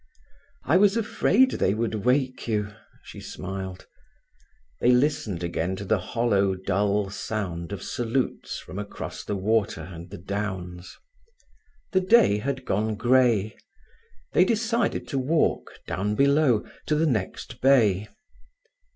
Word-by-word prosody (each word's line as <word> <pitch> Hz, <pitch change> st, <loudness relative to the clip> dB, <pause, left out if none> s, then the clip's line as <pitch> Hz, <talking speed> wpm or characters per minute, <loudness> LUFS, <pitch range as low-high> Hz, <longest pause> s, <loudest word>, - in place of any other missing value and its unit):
"I 160 Hz, +7 st, +3 dB
was 205 Hz, +2 st, +4 dB
afraid 230 Hz, +3 st, +3 dB
they 95 Hz, -, +1 dB
would 115 Hz, 0 st, -1 dB
wake 125 Hz, +5 st, 0 dB
you," 105 Hz, -2 st, -1 dB, 0.3 s
she -, -, -11 dB
smiled. 95 Hz, 0 st, -6 dB, 0.9 s
They 120 Hz, -, +3 dB
listened 125 Hz, -, +1 dB
again 85 Hz, +2 st, -2 dB
to 100 Hz, -, -7 dB
the 105 Hz, +1 st, +2 dB
hollow, 100 Hz, -2 st, +1 dB
dull 100 Hz, +1 st, 0 dB
sound 95 Hz, -5 st, -4 dB
of 100 Hz, -4 st, -5 dB
salutes 120 Hz, +2 st, -2 dB
from 95 Hz, -, -8 dB
across 100 Hz, 0 st, -6 dB
the 105 Hz, -, -3 dB
water 100 Hz, -3 st, 0 dB
and 85 Hz, +1 st, -9 dB
the 100 Hz, -, -8 dB
downs. 95 Hz, -2 st, -5 dB, 0.9 s
The 190 Hz, -, +3 dB
day 190 Hz, -, +5 dB
had 130 Hz, +2 st, -3 dB
gone 110 Hz, +2 st, 0 dB
grey. 120 Hz, -3 st, +3 dB, 0.8 s
They -, -, +6 dB
decided 225 Hz, +2 st, 0 dB
to 135 Hz, -, -1 dB
walk, 150 Hz, +5 st, 0 dB
down 105 Hz, +3 st, -2 dB
below, 140 Hz, -3 st, +3 dB, 0.2 s
to 155 Hz, -, +2 dB
the 155 Hz, +2 st, +2 dB
next 120 Hz, -, -3 dB
bay. 110 Hz, -7 st, +4 dB
110 Hz, 130 wpm, -25 LUFS, 95-135 Hz, 0.9 s, They